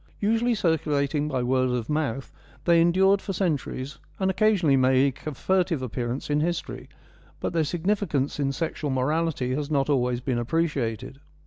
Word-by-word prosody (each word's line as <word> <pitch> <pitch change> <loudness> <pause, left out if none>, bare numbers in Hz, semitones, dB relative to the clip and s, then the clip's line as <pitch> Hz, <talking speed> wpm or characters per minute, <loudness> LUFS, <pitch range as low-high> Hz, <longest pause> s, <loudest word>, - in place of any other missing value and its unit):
Usually 230 +3 +1
circulating 150 -5 0
by 130 -4 -1
word 130 +1 +1
of 125 -2 -2
mouth, 145 -4 -2 0.3
they 170 -1 +5
endured 190 +3 +4
for 195 - -4
centuries, 150 -6 -2 0.2
and 190 -1 +2
occasionally 190 -7 +3
make 130 +2 +2
a 150 - -3
furtive 180 -3 0
appearance 125 +1 -3
in 150 0 +1
history, 170 +2 -3 0.5
but - - -3
their 165 -1 +2
significance 170 -4 -1
in 140 -1 +1
sexual 155 0 -3
morality 135 0 0
has 145 +2 -3
not 145 -1 +1
always 125 -3 +1
been 125 -1 -1
appreciated. 135 -3 -2
150 Hz, 150 wpm, -25 LUFS, 130-170 Hz, 0.5 s, they